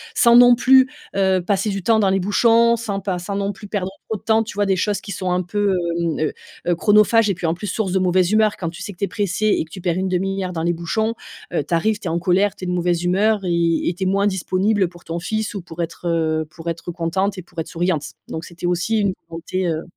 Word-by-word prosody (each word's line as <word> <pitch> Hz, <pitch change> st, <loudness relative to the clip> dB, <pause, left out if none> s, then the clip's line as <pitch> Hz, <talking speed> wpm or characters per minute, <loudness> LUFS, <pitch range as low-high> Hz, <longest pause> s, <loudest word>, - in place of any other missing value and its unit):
Sans 235 Hz, -3 st, +5 dB
non 245 Hz, 0 st, +8 dB
plus, 260 Hz, +1 st, +5 dB, 0.3 s
heu, 190 Hz, -1 st, +2 dB
passer 200 Hz, +1 st, 0 dB
du 195 Hz, -1 st, -3 dB
temps 225 Hz, -1 st, +3 dB
dans 195 Hz, -2 st, +3 dB
les 195 Hz, -, +2 dB
bouchons, 230 Hz, +4 st, +4 dB
sans 210 Hz, -4 st, -3 dB
pas 190 Hz, -2 st, -2 dB
sans 195 Hz, +3 st, -5 dB
non 200 Hz, 0 st, -1 dB
plus 205 Hz, +1 st, -11 dB
perdre 200 Hz, -2 st, -2 dB, 0.2 s
trop 220 Hz, -, -1 dB
de -, -, -21 dB
temps, 220 Hz, 0 st, +3 dB
tu 220 Hz, -, -9 dB
vois, 205 Hz, 0 st, +1 dB
des 190 Hz, -, +2 dB
choses 205 Hz, +2 st, -1 dB
qui 200 Hz, -, -8 dB
sont 185 Hz, -1 st, -2 dB
un 180 Hz, 0 st, +1 dB
peu, 200 Hz, +2 st, 0 dB, 0.2 s
hem, 170 Hz, -1 st, -1 dB
heu 155 Hz, -1 st, 0 dB, 0.3 s
heu, 175 Hz, -, +3 dB
chronophage 210 Hz, +4 st, +4 dB
et -, -, 0 dB
puis 170 Hz, -2 st, -3 dB
en 160 Hz, -, +1 dB
plus 175 Hz, -, -7 dB
source 195 Hz, 0 st, -2 dB
de 190 Hz, -, +2 dB
mauvaise 185 Hz, 0 st, +2 dB
humeur. 215 Hz, -1 st, +3 dB
Quand 170 Hz, -, -3 dB
tu 170 Hz, -, -10 dB
sais -, -, -6 dB
que 175 Hz, -, -24 dB
tu 200 Hz, -, +1 dB
es -, -, -6 dB
pressé 205 Hz, +1 st, -1 dB
et 205 Hz, -, +2 dB
que 160 Hz, -, -25 dB
tu 185 Hz, -, -8 dB
perds 175 Hz, 0 st, 0 dB
1/2 190 Hz, +1 st, -1 dB
heure 180 Hz, -, -5 dB
dans 165 Hz, -, -3 dB
les 175 Hz, +1 st, +1 dB
bouchons, 220 Hz, +7 st, -1 dB, 0.4 s
heu, 165 Hz, -, 0 dB
tu 155 Hz, -, -5 dB
arrives, 210 Hz, +6 st, +2 dB
tu -, -, -6 dB
es -, -, -1 dB
en 170 Hz, -, 0 dB
colère, 185 Hz, +4 st, +2 dB
tu 185 Hz, -, -7 dB
es -, -, -4 dB
de 180 Hz, -, -1 dB
mauvaise 175 Hz, -1 st, 0 dB
humeur 205 Hz, +5 st, +2 dB
et 170 Hz, -2 st, +1 dB
et -, -, -2 dB
tu 180 Hz, -, -5 dB
es -, -, 0 dB
moins 200 Hz, +2 st, +2 dB
disponible 190 Hz, +1 st, +1 dB
pour 175 Hz, 0 st, -17 dB
ton 165 Hz, +1 st, -4 dB
fils 215 Hz, +5 st, -3 dB
ou 195 Hz, -, -4 dB
pour 165 Hz, 0 st, -7 dB
être, 170 Hz, +1 st, -5 dB
heu, 160 Hz, -2 st, 0 dB
pour 170 Hz, -1 st, -7 dB
être 165 Hz, +1 st, -5 dB
contente 185 Hz, +4 st, -1 dB
et -, -, -5 dB
pour 175 Hz, -, -23 dB
être 160 Hz, -, -3 dB
souriante. 170 Hz, -3 st, -1 dB, 0.2 s
Donc 160 Hz, -, -5 dB
c'était 170 Hz, +1 st, -8 dB
aussi 180 Hz, +6 st, 0 dB
une 200 Hz, -2 st, +1 dB, 0.2 s
volonté, 175 Hz, +3 st, -3 dB
heu. 160 Hz, -1 st, -2 dB
190 Hz, 280 wpm, -21 LUFS, 175-205 Hz, 0.4 s, non